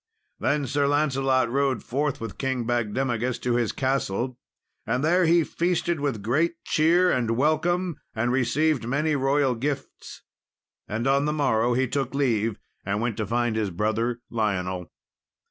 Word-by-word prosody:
] 425 Hz, -, -49 dB
Then 145 Hz, -1 st, +1 dB
Sir 140 Hz, +2 st, +1 dB
Lancelot 135 Hz, -3 st, +2 dB
rode 135 Hz, -1 st, 0 dB
forth 140 Hz, +2 st, -1 dB
with 115 Hz, -4 st, -7 dB
King 130 Hz, -3 st, -1 dB
Bagdemagus 120 Hz, +1 st, -1 dB
to 125 Hz, -, 0 dB
his 120 Hz, -2 st, +1 dB
castle, 130 Hz, -2 st, -1 dB, 0.4 s
and 125 Hz, +5 st, -1 dB
there 175 Hz, +3 st, +3 dB
he 170 Hz, 0 st, +5 dB
feasted 170 Hz, 0 st, -1 dB
with 135 Hz, -8 st, -2 dB
great 155 Hz, +10 st, +1 dB
cheer 175 Hz, +4 st, +3 dB
and 115 Hz, -2 st, 0 dB
welcome, 165 Hz, +4 st, +1 dB, 0.2 s
and 115 Hz, +2 st, 0 dB
received 135 Hz, +1 st, +1 dB
many 150 Hz, +4 st, +1 dB
royal 135 Hz, -1 st, +2 dB
gifts. 135 Hz, +3 st, -5 dB, 0.6 s
And 110 Hz, +3 st, -3 dB
on 140 Hz, +1 st, +3 dB
the 150 Hz, -, 0 dB
morrow 120 Hz, -5 st, +2 dB
he 130 Hz, +1 st, +1 dB
took 135 Hz, 0 st, -2 dB
leave 115 Hz, -6 st, +1 dB, 0.3 s
and 100 Hz, +1 st, -1 dB
went 115 Hz, -1 st, -1 dB
to 110 Hz, -3 st, -2 dB
find 120 Hz, +1 st, 0 dB
his 110 Hz, -2 st, 0 dB
brother 110 Hz, +6 st, -1 dB
Lionel. 95 Hz, -5 st, -1 dB
130 Hz, 155 wpm, -25 LUFS, 115-145 Hz, 0.6 s, he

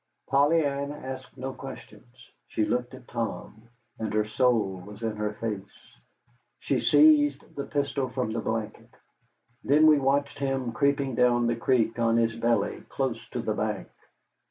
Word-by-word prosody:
Polly 145 Hz, +3 st, +3 dB
Ann 140 Hz, 0 st, -2 dB
asked 130 Hz, -2 st, -8 dB
no 130 Hz, +1 st, -4 dB
questions. 120 Hz, -1 st, -12 dB, 0.2 s
She 110 Hz, -, 0 dB
looked 125 Hz, +2 st, -2 dB
at 130 Hz, -1 st, -15 dB
Tom, 115 Hz, -1 st, -5 dB, 0.3 s
and 110 Hz, -2 st, -3 dB
her 105 Hz, 0 st, +2 dB
soul 110 Hz, -4 st, +1 dB
was 105 Hz, +3 st, -11 dB
in 110 Hz, -1 st, -1 dB
her 105 Hz, 0 st, -2 dB
face. 105 Hz, -3 st, -7 dB, 0.6 s
She -, -, -1 dB
seized 145 Hz, -1 st, +4 dB
the 140 Hz, -, -4 dB
pistol 140 Hz, -2 st, -1 dB
from 125 Hz, -3 st, -2 dB
the 115 Hz, -, -1 dB
blanket. 110 Hz, -1 st, -4 dB, 0.7 s
Then 150 Hz, +3 st, +5 dB
we 155 Hz, -2 st, +7 dB
watched 140 Hz, +1 st, 0 dB
him 135 Hz, -3 st, -1 dB
creeping 140 Hz, 0 st, +1 dB
down 120 Hz, 0 st, +3 dB
the 120 Hz, 0 st, +1 dB
creek 115 Hz, -1 st, +1 dB
on 115 Hz, 0 st, +3 dB
his 115 Hz, -1 st, +1 dB
belly, 115 Hz, -2 st, 0 dB
close 125 Hz, -4 st, -2 dB
to 120 Hz, -2 st, -4 dB
the 110 Hz, -, 0 dB
bank. 105 Hz, -3 st, -3 dB
125 Hz, 155 wpm, -27 LUFS, 115-140 Hz, 0.7 s, we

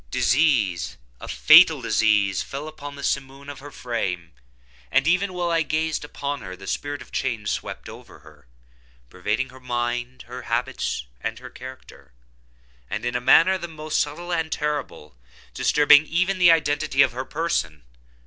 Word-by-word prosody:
Disease—a 95 Hz, -, 0 dB
fatal -, -, +7 dB
disease, 105 Hz, -4 st, +2 dB
fell 140 Hz, +2 st, -6 dB
like 145 Hz, -2 st, -8 dB
the 140 Hz, -, -9 dB
simoon 135 Hz, +1 st, -3 dB
upon 140 Hz, -2 st, -9 dB
her 145 Hz, -, -8 dB
frame; 95 Hz, -, -4 dB, 0.6 s
and, 135 Hz, +2 st, +2 dB
even 185 Hz, +3 st, +2 dB
while 175 Hz, -1 st, -2 dB
I 165 Hz, -1 st, +2 dB
gazed 155 Hz, 0 st, -1 dB
upon 145 Hz, -2 st, -5 dB
her, 95 Hz, -3 st, -8 dB
the 95 Hz, +1 st, -12 dB
spirit 145 Hz, +6 st, -4 dB
of -, -, -21 dB
change 115 Hz, -6 st, -2 dB
swept -, -, -5 dB
over -, -, -12 dB
her, -, -, -19 dB, 0.6 s
pervading 105 Hz, +8 st, -2 dB
her 130 Hz, +1 st, -14 dB
mind, 120 Hz, 0 st, -3 dB
her 125 Hz, +1 st, -8 dB
habits, 120 Hz, -, -2 dB, 0.2 s
and -, -, -3 dB
her -, -, -11 dB
character, 130 Hz, -, -12 dB, 0.8 s
and, 110 Hz, +3 st, -4 dB
in 120 Hz, -, -2 dB
a 125 Hz, -, 0 dB
manner 185 Hz, +9 st, +5 dB
the 170 Hz, -, -5 dB
most 155 Hz, -1 st, -3 dB
subtle 170 Hz, +4 st, -2 dB
and 165 Hz, -2 st, -1 dB
terrible, 140 Hz, -, -4 dB, 0.4 s
disturbing 150 Hz, +1 st, +5 dB
even 185 Hz, +3 st, 0 dB
the 175 Hz, -1 st, +7 dB
identity 150 Hz, -3 st, +3 dB
of -, -, +1 dB
her 125 Hz, +2 st, -4 dB
person! 130 Hz, -, -2 dB
135 Hz, 160 wpm, -23 LUFS, 115-155 Hz, 0.8 s, fatal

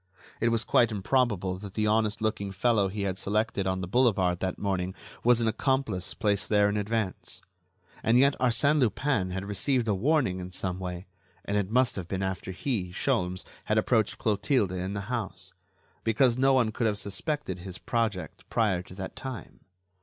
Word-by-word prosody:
It 115 Hz, -, +2 dB
was 115 Hz, 0 st, +1 dB
quite 120 Hz, +1 st, +3 dB
improbable 100 Hz, -4 st, 0 dB
that 100 Hz, -1 st, -9 dB
the 105 Hz, -, +1 dB
honest 110 Hz, 0 st, +1 dB
looking 105 Hz, -2 st, -1 dB
fellow 105 Hz, +1 st, +2 dB
he 100 Hz, +1 st, -4 dB
had 95 Hz, -1 st, -2 dB
selected 105 Hz, -1 st, 0 dB
on 95 Hz, 0 st, -1 dB
the 90 Hz, -, -4 dB
boulevard 95 Hz, -6 st, +2 dB
that 95 Hz, -1 st, -2 dB
morning 95 Hz, -2 st, -2 dB, 0.3 s
was 120 Hz, 0 st, +5 dB
an 115 Hz, -, +1 dB
accomplice 110 Hz, -5 st, 0 dB
placed 105 Hz, -3 st, 0 dB
there 105 Hz, -1 st, +4 dB
in 100 Hz, -, -1 dB
advance. 105 Hz, -1 st, -3 dB, 0.6 s
And 115 Hz, +2 st, +3 dB
yet 140 Hz, +2 st, +5 dB
Arsène 130 Hz, +5 st, +3 dB
Lupin 120 Hz, -4 st, +1 dB
had 95 Hz, +1 st, -4 dB
received 115 Hz, +5 st, +1 dB
a 105 Hz, -, +3 dB
warning 120 Hz, -, +1 dB
in 90 Hz, 0 st, -7 dB
some 90 Hz, 0 st, -2 dB
way, 90 Hz, 0 st, -5 dB, 0.4 s
and 100 Hz, -, -2 dB
it 100 Hz, -2 st, 0 dB
must 125 Hz, 0 st, +2 dB
have 90 Hz, -3 st, -4 dB
been 95 Hz, +1 st, -2 dB
after 95 Hz, -1 st, -3 dB
he, 95 Hz, -2 st, -2 dB
Sholmes, 90 Hz, 0 st, -1 dB, 0.2 s
had -, -, +1 dB
approached -, -, +2 dB
Clotilde 105 Hz, 0 st, +1 dB
in 95 Hz, +2 st, -3 dB
the 100 Hz, -, -2 dB
house, 95 Hz, -5 st, -4 dB, 0.5 s
because 115 Hz, +2 st, +3 dB
no 135 Hz, +2 st, +4 dB
one 120 Hz, -4 st, +3 dB
could 115 Hz, +1 st, 0 dB
have 105 Hz, -1 st, 0 dB
suspected 100 Hz, -, -2 dB
his 90 Hz, 0 st, -8 dB
project 115 Hz, -6 st, -2 dB
prior 105 Hz, -6 st, +1 dB
to 90 Hz, -, -13 dB
that 95 Hz, -1 st, -6 dB
time. 130 Hz, -4 st, -7 dB
105 Hz, 185 wpm, -28 LUFS, 95-120 Hz, 0.6 s, was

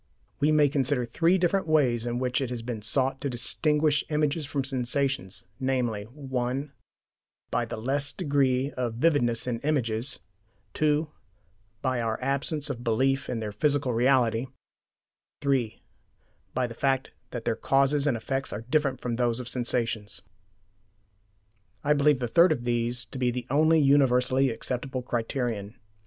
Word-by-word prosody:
We 150 Hz, +2 st, +3 dB
may 150 Hz, -1 st, +5 dB
consider 135 Hz, -2 st, 0 dB
three 165 Hz, +9 st, +2 dB
different 185 Hz, +1 st, +1 dB
ways 125 Hz, -7 st, +2 dB
in 120 Hz, 0 st, -1 dB
which 125 Hz, +1 st, 0 dB
it 130 Hz, -, -2 dB
has 120 Hz, -2 st, -5 dB
been 115 Hz, -2 st, -4 dB
sought 130 Hz, +5 st, 0 dB
to 140 Hz, -, -1 dB
distinguish 150 Hz, +4 st, +2 dB
images 150 Hz, 0 st, 0 dB
from 140 Hz, -1 st, -2 dB
sensations, 130 Hz, -5 st, -2 dB
namely: 125 Hz, -6 st, -1 dB
(1) 130 Hz, +2 st, -3 dB, 0.8 s
By -, -, +1 dB
the -, -, -6 dB
less 140 Hz, +5 st, -1 dB
degree 135 Hz, -1 st, +1 dB
of 120 Hz, -4 st, -3 dB
vividness 120 Hz, -4 st, +2 dB
in 120 Hz, -2 st, -2 dB
images; 125 Hz, -3 st, 0 dB, 0.5 s
(2) 155 Hz, +1 st, +1 dB, 0.8 s
By 130 Hz, -2 st, 0 dB
our 110 Hz, -1 st, -1 dB
absence 140 Hz, +3 st, -1 dB
of 120 Hz, -3 st, -7 dB
belief 135 Hz, +4 st, +1 dB
in 115 Hz, -, -2 dB
their 105 Hz, -1 st, -3 dB
"physical 135 Hz, +3 st, +1 dB
reality"; 120 Hz, 0 st, +2 dB, 0.9 s
(3) 135 Hz, -6 st, 0 dB, 0.7 s
By 130 Hz, -, +1 dB
the 120 Hz, -, -6 dB
fact 135 Hz, +2 st, 0 dB, 0.2 s
that 120 Hz, -2 st, -6 dB
their 115 Hz, -, +1 dB
causes 140 Hz, +3 st, +2 dB
and 130 Hz, -5 st, +2 dB
effects 135 Hz, +4 st, -3 dB
are 110 Hz, +3 st, -6 dB
different 145 Hz, -4 st, +1 dB
from 120 Hz, -2 st, -2 dB
those 120 Hz, -1 st, +1 dB
of 125 Hz, -, -6 dB
sensations. 115 Hz, -5 st, -2 dB, 1.6 s
I 150 Hz, -, +4 dB
believe 145 Hz, -1 st, +4 dB
the 125 Hz, -1 st, -2 dB
third 170 Hz, +9 st, +5 dB
of 130 Hz, -6 st, -1 dB
these 120 Hz, 0 st, -1 dB
to 120 Hz, +4 st, -8 dB
be 125 Hz, -1 st, +2 dB
the 120 Hz, 0 st, -3 dB
only 155 Hz, +3 st, +4 dB
universally 135 Hz, -2 st, +3 dB
applicable 125 Hz, +2 st, -4 dB
criterion. 115 Hz, -3 st, -3 dB
130 Hz, 150 wpm, -27 LUFS, 120-140 Hz, 1.6 s, may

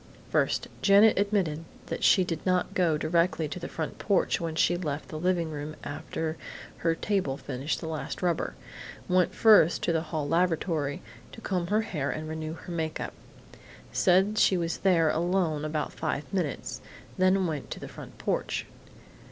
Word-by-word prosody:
"First: -, -, +1 dB
Janet 200 Hz, +1 st, +6 dB
admitted 195 Hz, -7 st, 0 dB, 0.2 s
that -, -, -5 dB
she 185 Hz, -, +6 dB
did 165 Hz, -3 st, -4 dB
not 185 Hz, -1 st, +1 dB
go 170 Hz, -4 st, +2 dB
directly 165 Hz, +1 st, +1 dB
to 150 Hz, -, -6 dB
the -, -, -5 dB
front 160 Hz, -2 st, -5 dB
porch 200 Hz, -4 st, +1 dB
when 165 Hz, -1 st, -3 dB
she 175 Hz, +2 st, +3 dB
left 150 Hz, -4 st, -4 dB
the 155 Hz, -, -5 dB
living 175 Hz, -2 st, 0 dB
room 150 Hz, +1 st, -5 dB
after 160 Hz, +2 st, -4 dB, 0.4 s
her 165 Hz, -1 st, +1 dB
table 185 Hz, -9 st, -1 dB
finished 130 Hz, +2 st, -3 dB
the 160 Hz, -, -6 dB
last 160 Hz, +3 st, -4 dB
rubber. 175 Hz, -2 st, 0 dB, 0.5 s
Went 180 Hz, -1 st, +2 dB
first 210 Hz, -7 st, +6 dB
to 170 Hz, -, +2 dB
the 160 Hz, -, +1 dB
hall 155 Hz, -3 st, -3 dB
lavatory 165 Hz, -3 st, 0 dB, 0.3 s
to 225 Hz, -, -10 dB
comb 180 Hz, -4 st, -1 dB
her 210 Hz, +4 st, +2 dB
hair 150 Hz, -10 st, -3 dB
and 155 Hz, +3 st, -4 dB
renew 160 Hz, 0 st, -4 dB
her 175 Hz, -, -9 dB
make 160 Hz, -2 st, -2 dB
up. -, -, -4 dB, 0.8 s
Said 190 Hz, +4 st, +3 dB
she 190 Hz, -, +4 dB
was 165 Hz, -1 st, -2 dB
there 170 Hz, -5 st, +4 dB
alone 170 Hz, -3 st, 0 dB
about 155 Hz, -1 st, -2 dB
five 140 Hz, +4 st, -3 dB
minutes, 175 Hz, -7 st, -2 dB, 0.4 s
then 185 Hz, 0 st, +4 dB
went 155 Hz, -5 st, -3 dB
to -, -, -6 dB
the -, -, -7 dB
front -, -, -11 dB
porch. -, -, -1 dB
165 Hz, 170 wpm, -28 LUFS, 155-185 Hz, 0.8 s, Janet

